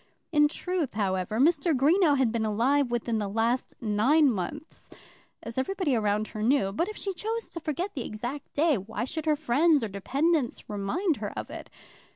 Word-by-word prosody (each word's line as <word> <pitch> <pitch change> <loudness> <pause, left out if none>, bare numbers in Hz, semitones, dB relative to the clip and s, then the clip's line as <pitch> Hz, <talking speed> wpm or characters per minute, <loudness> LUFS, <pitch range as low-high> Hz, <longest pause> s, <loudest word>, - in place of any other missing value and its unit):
In 295 -2 +5
truth, 345 - -3
however, 195 0 -1
Mr. 315 +1 +3
Greenow 300 +2 +4
had 260 -4 +2
been 230 -1 -1
alive 245 +6 +2
within 235 -1 -1
the 205 - -2
last 230 +5 -1
nine 250 +7 +3
months, 235 - -6 0.5
as 230 +3 -4
everybody 345 -1 0
around 210 -1 0
her 215 - -6
knew. 225 -4 +2
But 335 - -1
if 430 - -7
she 390 - -3
chose 450 +5 -4
to 335 - -5
forget 335 +5 -3
the 255 - -4
exact 245 +8 -6
day, 300 -5 +3
why 215 +4 -4
should 315 +4 -5
her 305 - +4
friends 295 +1 +3
or 220 - -2
dependents 270 - 0
remind 270 - -1
her - - -4
of - - -5
it? - - -8
265 Hz, 185 wpm, -27 LUFS, 220-315 Hz, 0.5 s, In